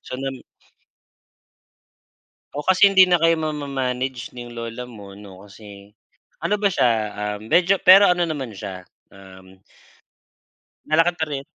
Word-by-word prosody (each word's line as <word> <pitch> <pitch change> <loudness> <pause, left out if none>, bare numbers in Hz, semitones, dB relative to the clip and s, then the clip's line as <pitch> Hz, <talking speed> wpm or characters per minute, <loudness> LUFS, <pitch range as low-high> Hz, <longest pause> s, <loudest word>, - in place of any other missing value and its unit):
so 130 - -8
nam 135 0 -6 2.1
O 145 - -5
kasi 190 +2 +5
hindi 190 -1 +6
na 180 - +4
kayo 165 -1 +2
mama-manage 135 -4 -4
nung 120 -1 -9
lola 115 +1 -7
mo 105 -5 -13
'no 100 -2 -13
kasi 100 -1 -14 0.6
ano 210 0 0
ba 205 - +3
siya 150 -10 +1 0.3
ah 105 0 -3
medyo 180 - +2
pero 195 +2 +7
ano 175 -1 -1
naman 135 -7 -5
siya, 95 -2 -8 0.2
um 95 -1 -16 1.3
Nalakad 165 +3 +2
pa 160 - 0
rin 140 -1 -4
130 Hz, 135 wpm, -21 LUFS, 105-165 Hz, 2.1 s, pero